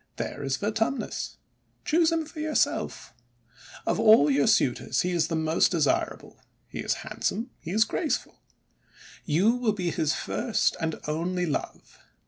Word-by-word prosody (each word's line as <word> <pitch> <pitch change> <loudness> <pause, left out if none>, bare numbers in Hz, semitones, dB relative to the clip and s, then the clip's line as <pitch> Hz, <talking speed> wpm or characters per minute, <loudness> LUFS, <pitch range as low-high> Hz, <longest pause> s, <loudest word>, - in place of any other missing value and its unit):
There - - -5
is 135 -1 -1
Vertumnus. 225 +5 -2 0.5
Choose 325 +1 +3
him 325 -1 0
for 310 +1 -11
yourself. 310 0 -1 0.7
Of - - 0
all 215 -10 +6
your 140 +1 +3
suitors 125 -3 +2
he 180 - -1
is 170 -2 +1
the 165 - -2
most 160 0 +2
desirable. 160 -6 -1 0.3
He - - -8
is - - 0
handsome, 230 +5 -3
he - - -9
is 215 +5 +4
graceful. 305 +7 -3 0.5
' - - -21
You 195 +7 +5
will 245 -3 0
be 180 -4 -2
his 155 -1 0
first 235 -3 0
and 160 -1 -2
only 175 +4 -1
love 150 - -5
185 Hz, 150 wpm, -27 LUFS, 160-235 Hz, 0.7 s, all